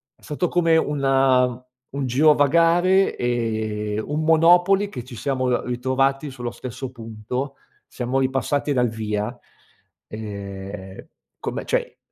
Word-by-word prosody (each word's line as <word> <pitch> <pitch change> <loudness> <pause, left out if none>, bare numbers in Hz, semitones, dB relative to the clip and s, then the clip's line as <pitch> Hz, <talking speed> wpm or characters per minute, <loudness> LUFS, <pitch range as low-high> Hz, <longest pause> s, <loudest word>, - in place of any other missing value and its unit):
è - - -32
stato 150 +4 -2
come 165 -1 +3
un 135 -4 +2 0.3
un 140 0 -3
girovagare 165 +7 +4
e 110 -3 -2
un 150 +2 -2
monopoli, 175 +5 +5
che 125 -11 -7
ci 125 -3 -11
siamo 130 0 -1
r 120 - 0
ritrovati 135 +3 0
sullo 120 -2 -5
stesso 130 +1 -7
punto, 120 +3 -5 0.3
siamo 125 +2 -2
ripassati 135 +2 0
dal 125 -3 +2
via, 110 +1 -3 0.7
ehm, 100 -2 -8 0.3
come - - -4
cioè, - - -1
130 Hz, 120 wpm, -22 LUFS, 115-145 Hz, 0.7 s, monopoli